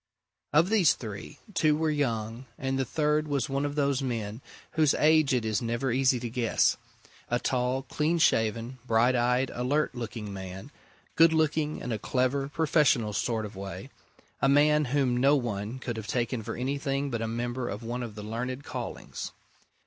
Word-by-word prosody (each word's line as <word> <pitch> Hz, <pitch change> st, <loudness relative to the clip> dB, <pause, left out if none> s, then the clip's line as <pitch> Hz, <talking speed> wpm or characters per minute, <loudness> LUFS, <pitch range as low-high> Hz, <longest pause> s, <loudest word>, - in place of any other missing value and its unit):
Of 160 Hz, +5 st, +4 dB
these 195 Hz, -8 st, +5 dB
three, 105 Hz, -4 st, -8 dB, 0.2 s
two 155 Hz, -4 st, +3 dB
were 160 Hz, 0 st, +1 dB
young, 115 Hz, -4 st, -2 dB
and 135 Hz, 0 st, -1 dB
the 135 Hz, -, +1 dB
third 150 Hz, +1 st, +1 dB
was 140 Hz, -4 st, 0 dB
one 140 Hz, +1 st, 0 dB
of 145 Hz, 0 st, -3 dB
those 140 Hz, -2 st, +1 dB
men 115 Hz, -3 st, -3 dB, 0.3 s
whose 155 Hz, -3 st, +3 dB
age 155 Hz, -1 st, +4 dB
it 125 Hz, -3 st, +1 dB
is 110 Hz, +1 st, 0 dB
never 120 Hz, +2 st, -1 dB
easy 130 Hz, 0 st, +3 dB
to 120 Hz, -, -3 dB
guess 115 Hz, -1 st, +2 dB, 0.5 s
a 120 Hz, -, +2 dB
tall, 125 Hz, +1 st, 0 dB
clean 155 Hz, +5 st, 0 dB
shaven, 115 Hz, -3 st, +1 dB
bright 115 Hz, +3 st, +3 dB
eyed, 125 Hz, +2 st, +2 dB
alert 135 Hz, +5 st, 0 dB
looking 115 Hz, -4 st, -5 dB
man, 95 Hz, +6 st, -8 dB, 0.4 s
good 165 Hz, 0 st, +6 dB
looking 155 Hz, -1 st, +1 dB
in 125 Hz, -, -4 dB
a 110 Hz, -, -1 dB
clever, 130 Hz, +4 st, 0 dB
professional 145 Hz, -8 st, +2 dB
sort 110 Hz, 0 st, -1 dB
of 105 Hz, -, -9 dB
way, 95 Hz, 0 st, -7 dB, 0.5 s
a 135 Hz, -, +4 dB
man 150 Hz, +1 st, +4 dB
whom 130 Hz, -1 st, +1 dB
no 135 Hz, +3 st, +5 dB
one 115 Hz, -3 st, -2 dB
could 120 Hz, -3 st, -5 dB
have 110 Hz, -1 st, -6 dB
taken 120 Hz, +1 st, -1 dB
for 115 Hz, +1 st, -5 dB
anything 140 Hz, +2 st, -2 dB
but 115 Hz, -1 st, -2 dB
a 115 Hz, -, -1 dB
member 120 Hz, +2 st, -3 dB
of 105 Hz, +3 st, -5 dB
one 120 Hz, +2 st, -3 dB
of 115 Hz, -4 st, -6 dB
the 105 Hz, -, -7 dB
learned 125 Hz, +5 st, -4 dB
callings. -, -, -6 dB
125 Hz, 180 wpm, -28 LUFS, 115-145 Hz, 0.5 s, good